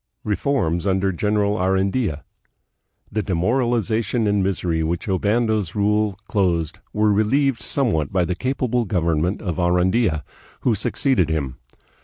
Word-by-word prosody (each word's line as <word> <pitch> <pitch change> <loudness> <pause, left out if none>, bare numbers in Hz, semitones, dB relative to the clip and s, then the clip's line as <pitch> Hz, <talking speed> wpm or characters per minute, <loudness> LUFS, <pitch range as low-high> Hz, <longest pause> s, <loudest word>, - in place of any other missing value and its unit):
Reforms 100 - 0
under 95 0 +1
General 105 +2 0
Arandia. 95 - 0 0.9
The 110 - 0
demoralization 115 +4 0
and 100 -1 +2
misery 90 -4 -1
with 80 - -1 0.2
which - - -13
Obando's 105 0 0
rule 105 -1 +1
closed 85 -6 0
were 105 0 +2
relieved 115 +4 +2
somewhat 105 - 0
by 90 -2 +2
the 90 - -1
capable 125 +2 -1
government 85 0 0
of 90 -6 -3
Arandia, 90 -1 +2 0.4
who 120 - +2
succeeded 110 - +1
him. 70 -6 -2
100 Hz, 125 wpm, -22 LUFS, 90-110 Hz, 0.9 s, and